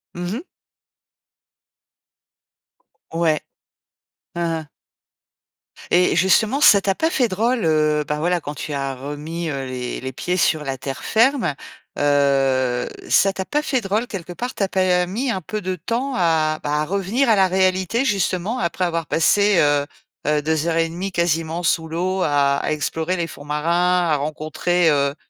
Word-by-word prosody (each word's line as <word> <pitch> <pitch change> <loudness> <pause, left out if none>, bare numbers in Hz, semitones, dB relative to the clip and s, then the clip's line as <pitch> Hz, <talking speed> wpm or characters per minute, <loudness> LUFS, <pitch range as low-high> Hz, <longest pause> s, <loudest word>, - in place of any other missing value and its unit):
Mmh 175 +1 -4
mh. 255 - -4 2.7
Ouais. 165 -2 +1 1.0
Han 170 0 -2
han. 160 -2 -4 1.2
Et, 180 +1 +4
et - - +1
justement 220 +8 +3
ça 200 -8 +7
t'a 195 0 +1
pas 320 +11 0
fait 265 -8 +1
drôle, 225 +2 0
heu, 155 -1 +2
ben 150 0 -2
voilà 175 +3 +1
quand 145 - -6
tu 145 +1 -6
as 140 -1 -2
remis, 150 +5 -5
heu 135 -2 -3
les 125 -1 -5
les 130 +1 -5
pieds 180 +7 -2
sur 155 -3 +2
la 135 -2 -3
terre 135 0 -6
ferme? 235 - +2 0.4
Heu, 135 -3 +2 0.2
ça 195 0 +4
t'a 190 - -3
pas 295 +9 -1
fait 260 -4 0
drôle, 210 +3 -1
quelque 190 -8 -7
part? 245 +7 -4
Tu - - -7
as 195 - +2
pas 180 -2 +2
mis 240 +8 -2
un 190 - -3
peu 215 +5 -5
de 185 0 -2
temps 235 - -3
à 160 -3 +1
bah, 150 +1 0
à 155 - -1
revenir 200 - 0
à 225 - +5
la 190 -1 +4
réalité 190 +6 +1
justement 200 +1 0
après 180 +1 -1
avoir 165 -2 -2
passé, 200 +5 +3
heu 145 -1 +2 0.4
heu, 150 0 +2
2 160 +1 0
heures 165 -1 0
et 165 0 +1
1/2, 185 +4 -5
quasiment 165 0 -1
sous 160 -1 +1
l'eau 185 +4 -2
à 140 -3 +2
à - - -2
explorer 160 +4 -2
les 170 - -1
fonds 145 -3 -11
marins, 170 +4 +1
à - - +4
rencontrer, 155 +3 0
heu, 140 -1 +1
170 Hz, 175 wpm, -21 LUFS, 150-190 Hz, 2.7 s, ça